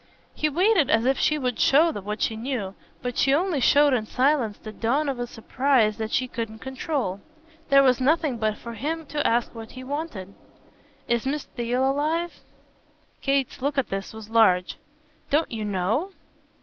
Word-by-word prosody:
He 305 - 0
waited 355 - +3
as 225 +1 +3
if 265 0 +2
she 305 - +2
would 250 -4 -2
show 315 +5 +5
what 210 -4 -4
she 220 - 0
knew; 225 -5 -3 0.3
but 245 -1 -3
she 275 0 +4
only 345 -2 0
showed 285 +2 +5
in 220 -4 0
silence 255 -5 +1
the 215 - -9
dawn 265 +8 0
of 270 -3 -2
a 245 - -2
surprise 235 -2 +1
that 220 -1 -3
she 255 - +1
couldn't 225 -2 -5
control. 260 - -3 0.5
There 275 0 +6
was 255 -1 +3
nothing 290 -2 +1
but 215 -1 0
for 235 - -8
him 310 +8 -3
to 295 +1 -1
ask 235 +1 +1
what 225 -1 -9
he 255 - -8
wanted. 260 - -5 0.7
"Is 235 +1 0
Miss 290 +1 -1
Theale 245 +2 -1
alive?" 310 +5 0 0.9
Kate's 275 -3 0
look 285 +2 -1
at 270 - +1
this 195 0 -4
was 220 -1 -10
large. 185 -6 +3 0.5
"Don't 300 +3 +1
you 220 -2 -4
KNOW?" 210 - -1
255 Hz, 175 wpm, -25 LUFS, 225-290 Hz, 0.9 s, There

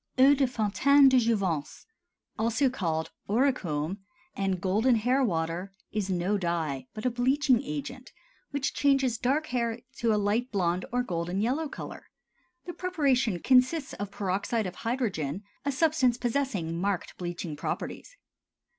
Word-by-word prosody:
EAU 270 +2 +7
DE 275 -1 +2
FONTAINE 265 +5 +4
DE 260 -1 +5
JOUVENCE, 195 -10 -1 0.5
also 235 +4 +2
called 160 -9 -2 0.2
Auricome 200 - 0 0.4
and 195 -2 -1
Golden 215 +7 +2
Hair 250 +5 +2
Water, 170 -2 -1 0.2
is 210 -2 -2
no 185 +3 0
dye, 160 -7 -2
but 215 - -6
a 250 - +2
bleaching 255 +1 +2
agent 245 - -6 0.4
which 285 0 -2
changes 270 -5 +2
dark 280 +5 +1
hair 235 -1 0 0.2
to 230 -1 +1
a 210 - +3
light 210 +5 0
blond 180 -3 0
or 245 +1 +1
golden 175 -3 -2
yellow 270 +8 0
color. - - -8 0.6
The 350 - -5
preparation 270 - +1
consists 265 +3 +3
of 205 -1 -5
peroxide 200 +3 -1
of 185 - -6
hydrogen, 205 - -2 0.2
a 285 - +1
substance 275 -4 +2
possessing 230 -10 -1
marked 195 -2 -2
bleaching 175 -3 -4
properties. - - -5
225 Hz, 140 wpm, -28 LUFS, 180-260 Hz, 0.6 s, EAU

